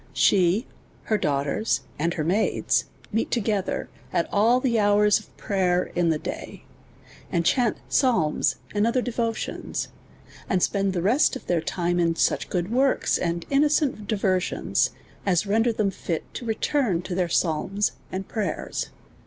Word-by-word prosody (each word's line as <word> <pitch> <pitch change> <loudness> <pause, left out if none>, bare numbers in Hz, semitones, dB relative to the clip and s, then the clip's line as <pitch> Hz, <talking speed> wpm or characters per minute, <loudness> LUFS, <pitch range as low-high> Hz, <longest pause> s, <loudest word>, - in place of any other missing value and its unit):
S!ie, 190 +5 +3 0.4
her 215 - +1
daughters, 140 - 0 0.2
and 170 +3 0
her 155 - -1
maids, 190 +7 +1 0.3
meet 225 +1 0
together 210 -4 -1 0.2
at 170 - +1
all 225 +5 +4
the 240 -3 +1
hours 205 0 +4
of 215 - -19
prayer 180 -3 0
in 175 -1 +2
the 160 - +2
day, - - -7 0.7
and 170 -2 0
chaunt 245 0 +2
psalms 185 - +2 0.2
and 210 +1 +2
other 245 +1 +1
devotions, 230 -2 -3 0.6
and 185 -3 +2
spend 195 -1 +1
the 175 -2 -1
rest 250 +9 +3
of 265 - -8
their 175 -2 +1
time 175 +1 -1
in 165 -1 +2
such - - +1
good 180 +2 -2
works, 265 +2 +2
and 170 -1 -2
innocent 285 -6 +2
diversions, 195 -4 +1 0.3
as 185 -1 +2
render 225 +4 +2
tliem 210 -3 0
fit 165 -3 -3
to 245 - -6
return 225 - 0
to 180 - -5
their 175 -1 0
psalms 190 +5 +1 0.2
and 190 +1 -4
prayers. 205 -8 -3
200 Hz, 150 wpm, -25 LUFS, 175-225 Hz, 0.7 s, all